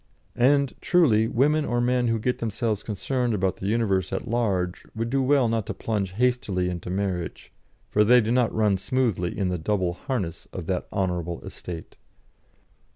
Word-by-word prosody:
And, 140 Hz, +2 st, +3 dB
truly, 125 Hz, -, +4 dB
women 150 Hz, +6 st, +2 dB
or 120 Hz, -4 st, 0 dB
men 125 Hz, 0 st, +2 dB
who 115 Hz, 0 st, +1 dB
get 125 Hz, +3 st, -1 dB
themselves 110 Hz, -1 st, -1 dB
concerned 120 Hz, +3 st, -1 dB
about 95 Hz, -2 st, 0 dB
the 95 Hz, -, -4 dB
universe 100 Hz, -4 st, +1 dB
at -, -, -3 dB
large, 100 Hz, -6 st, 0 dB
would 115 Hz, +1 st, -2 dB
do 135 Hz, 0 st, +2 dB
well 135 Hz, -1 st, +3 dB
not 115 Hz, -2 st, -1 dB
to -, -, -4 dB
plunge 100 Hz, -4 st, -2 dB
hastily 115 Hz, -6 st, +1 dB
into 90 Hz, 0 st, -6 dB
marriage, 90 Hz, -3 st, -3 dB, 0.3 s
for 105 Hz, -, +3 dB
they 125 Hz, +4 st, +6 dB
do 115 Hz, -1 st, 0 dB
not 125 Hz, -1 st, +3 dB
run 105 Hz, -3 st, +2 dB
smoothly 110 Hz, -7 st, 0 dB
in 95 Hz, -3 st, 0 dB
the 90 Hz, -1 st, -2 dB
double 95 Hz, 0 st, 0 dB
harness 95 Hz, -5 st, -4 dB
of -, -, -6 dB
that -, -, -2 dB
honourable 90 Hz, -3 st, -2 dB
estate. 85 Hz, -2 st, -8 dB
110 Hz, 170 wpm, -25 LUFS, 95-125 Hz, 0.3 s, they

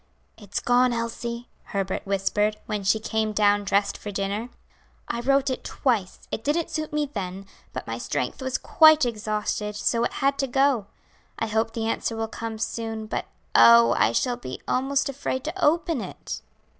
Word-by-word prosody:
"It's 205 Hz, -2 st, -4 dB
gone, 245 Hz, 0 st, +3 dB
Elsie," 235 Hz, +1 st, -4 dB, 0.2 s
Herbert 195 Hz, -1 st, -3 dB
whispered, 205 Hz, +2 st, +1 dB
when 210 Hz, -1 st, -3 dB
she 205 Hz, +3 st, +3 dB
came 220 Hz, 0 st, -1 dB
down 205 Hz, 0 st, +3 dB
dressed 200 Hz, +1 st, +1 dB
for 210 Hz, -, -6 dB
dinner. 200 Hz, +4 st, -2 dB, 0.6 s
"I 235 Hz, -, -2 dB
wrote 275 Hz, +2 st, +2 dB
it 255 Hz, -, -4 dB
twice; 225 Hz, -9 st, -1 dB
it 220 Hz, -, -3 dB
didn't 310 Hz, +5 st, 0 dB
suit 310 Hz, -1 st, -3 dB
me 300 Hz, -1 st, -1 dB
then, 195 Hz, -1 st, -5 dB, 0.3 s
but -, -, -6 dB
my -, -, -4 dB
strength -, -, -3 dB
was 260 Hz, 0 st, -1 dB
quite 315 Hz, -3 st, +6 dB
exhausted, 210 Hz, -2 st, -2 dB
so 230 Hz, +2 st, +1 dB
it -, -, -1 dB
had 275 Hz, 0 st, +1 dB
to 270 Hz, -, +1 dB
go. 265 Hz, -4 st, +2 dB, 0.5 s
I -, -, -1 dB
hope 220 Hz, +1 st, 0 dB
the 225 Hz, -1 st, -2 dB
answer 225 Hz, 0 st, -1 dB
will 225 Hz, 0 st, -2 dB
come 225 Hz, 0 st, -5 dB
soon, 225 Hz, 0 st, -3 dB
but -, -, -3 dB, 0.3 s
oh, 115 Hz, 0 st, +8 dB
I 110 Hz, -, +3 dB
shall 245 Hz, -, 0 dB
be 130 Hz, 0 st, -7 dB
almost 270 Hz, +2 st, +1 dB
afraid 260 Hz, -1 st, -3 dB
to 340 Hz, +3 st, -4 dB
open 325 Hz, -3 st, +2 dB
it." -, -, -6 dB
225 Hz, 175 wpm, -25 LUFS, 205-260 Hz, 0.6 s, oh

